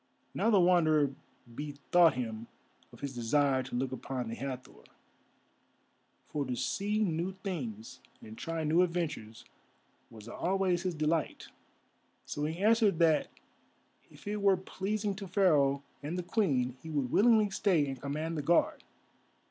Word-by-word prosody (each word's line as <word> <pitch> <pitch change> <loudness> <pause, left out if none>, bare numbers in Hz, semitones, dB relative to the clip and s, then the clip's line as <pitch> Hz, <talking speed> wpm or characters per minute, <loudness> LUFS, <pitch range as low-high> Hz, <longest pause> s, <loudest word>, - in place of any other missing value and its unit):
Now - - +1
the 205 -4 +5
Wanderer 155 -5 +4 0.4
bethought 150 +4 +2
him 115 -2 -4 0.4
of - - -16
his 140 -1 -4
desire 130 +3 +2
to 130 -1 -7
look 130 +1 -1
upon 130 -2 -4
the - - -4
Hathor, 130 0 -7 1.4
for 145 - -2
to 125 -2 -3
see 195 - -1
new 175 0 -1
things 120 - -5 0.2
and 110 - -11
try 165 +5 -4
new 160 +3 +3
adventures 165 -11 -2 0.6
was 110 -1 -12
always 180 +6 0
his 180 -2 -2
delight. 155 +1 -1 0.8
So 145 - -3
he 160 +2 -3
answered 220 -4 +4
that 160 -2 +3 0.8
if - - -16
it 210 0 -2
were 195 -1 +4
pleasing 200 +3 -3
to 200 -2 -6
Pharaoh 150 -8 +3 0.2
and 155 +5 -4
the 180 - -2
Queen 135 - 0
he 160 - -9
would 140 -5 -1
willingly 215 -2 +4
stay 180 -6 +2
and 135 -3 -6
command 155 +3 -3
the - - -1
Guard. 170 +4 +2
155 Hz, 145 wpm, -31 LUFS, 135-185 Hz, 1.4 s, the